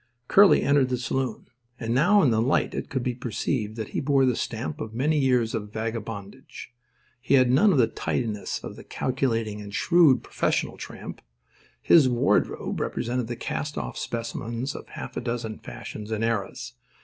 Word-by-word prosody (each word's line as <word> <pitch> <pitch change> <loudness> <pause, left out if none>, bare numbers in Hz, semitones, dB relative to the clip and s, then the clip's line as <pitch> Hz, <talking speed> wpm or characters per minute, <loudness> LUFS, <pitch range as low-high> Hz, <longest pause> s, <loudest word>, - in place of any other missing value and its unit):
Curly 200 0 +6
entered 140 -2 +3
the 125 - 0
saloon. 125 -1 -2 0.3
And 115 -1 -2
now 195 +10 +5
in 130 - +4
the 110 0 +2
light 125 - +1
it - - -4
could 130 -2 -2
be 125 - -1
perceived 115 -2 -3
that 110 -2 -5
he - - -2
bore 135 -1 +3
the 125 -2 +2
stamp 130 +9 -4
of 110 0 -6
many 150 +5 +1
years 125 -4 +2
of 105 -2 -4
vagabondage. 110 +2 -6 0.5
He 140 - +3
had 130 -2 +5
none 180 +11 +5
of 175 - +2
the 125 - +6
tidiness 110 -3 -3
of - - -8
the - - -10
calculating 115 -5 -1
and 100 -1 -9
shrewd 170 -7 +4
professional - - -1
tramp. - - -8 0.6
His 150 -6 +6
wardrobe 120 -1 +1
represented 120 0 -2
the 120 - -4
cast 145 +5 -4
off - - -4
specimens 115 +2 -4
of - - -9
half - - -7
a - - -1
dozen 115 -2 -4
fashions 105 0 -8
and 110 0 -2
eras. 115 +2 -2
120 Hz, 175 wpm, -26 LUFS, 115-135 Hz, 0.6 s, Curly